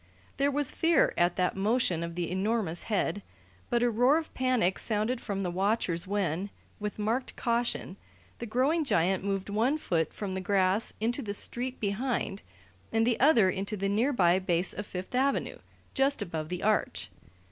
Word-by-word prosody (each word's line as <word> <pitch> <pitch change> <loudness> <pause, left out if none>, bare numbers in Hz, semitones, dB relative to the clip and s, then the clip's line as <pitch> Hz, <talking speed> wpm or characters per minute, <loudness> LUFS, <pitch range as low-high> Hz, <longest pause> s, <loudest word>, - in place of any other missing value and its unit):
There 280 +1 +2
was 285 -1 0
fear 330 0 +3
at 175 0 +2
that 180 -1 0
motion 195 -4 +1
of 170 0 -5
the 175 -1 -2
enormous 190 -3 -1
head, 205 -1 0 0.5
but 240 0 +2
a 240 - +3
roar 250 +7 +4
of 325 -1 -5
panic 255 -8 +1
sounded 220 +3 0
from 200 -2 -3
the 180 -2 -2
watchers 185 -2 0
when, 195 -1 -1 0.3
with 210 0 -4
marked 225 +5 -1
caution, 235 -5 -1 0.4
the 235 - -5
growing 270 +9 +2
giant 190 - +1
moved 195 -1 -2
one 225 +8 +1
foot 165 - -1
from 205 -2 -5
the 190 - -3
grass 195 +1 +2
into 240 +5 -1
the 205 -4 -2
street 250 +4 -2
behind 210 -1 -2 0.5
and 225 0 +2
the 235 -1 +1
other 235 -9 +5
into 200 +3 -3
the 195 +1 -1
nearby 200 -5 +3
base 180 -1 0
of 205 - -6
Fifth 185 +4 -6
Avenue, 270 +2 0 0.3
just 275 +1 +1
above 160 -2 -5
the 180 0 -4
Arch. 215 0 0
210 Hz, 170 wpm, -29 LUFS, 185-245 Hz, 0.5 s, other